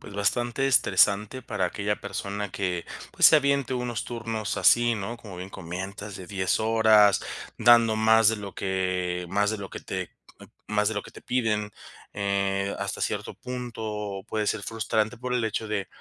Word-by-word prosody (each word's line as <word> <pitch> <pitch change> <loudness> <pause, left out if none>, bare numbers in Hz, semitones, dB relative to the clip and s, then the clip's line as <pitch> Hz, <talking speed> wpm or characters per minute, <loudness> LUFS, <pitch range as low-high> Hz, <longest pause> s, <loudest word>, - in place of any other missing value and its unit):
pues 100 - -11
bastante 120 +6 0
estresante 110 -2 +3
para 105 -5 -1
aquella 100 +3 -2
persona 100 0 -4
que, 90 -3 -2 0.3
pues - - +6
se 155 - +8
aviente 140 -2 +1
unos 120 -1 -3
turnos 115 -3 -4
así, 120 0 +5
¿no?, 110 +2 -4
como 105 -6 -11
bien 95 +2 -7
comentas, 95 +3 -6
de 95 - -9
10 95 -1 0
horas, 110 -2 +5 0.4
dando 115 -2 +6
más 110 0 +5
de 110 - +2
lo 100 -1 -8
que 90 -2 -2
más 100 +3 +1
de 110 - -3
lo 100 -2 -7
que - - -7
te - - -5 0.6
más 105 -1 +2
de 110 - -3
lo 105 - -2
que - - -13
te - - -13
piden, 110 -4 -1 0.4
eh, 100 -1 0
hasta - - -3
cierto - - -2
punto 110 -5 -5
puede 110 -1 -2
ser 105 -1 -1
frustrante 110 +1 -1
por 125 0 -3
el 120 -2 +1
hecho 110 0 -2
de 100 -2 -3
105 Hz, 175 wpm, -26 LUFS, 100-115 Hz, 0.6 s, se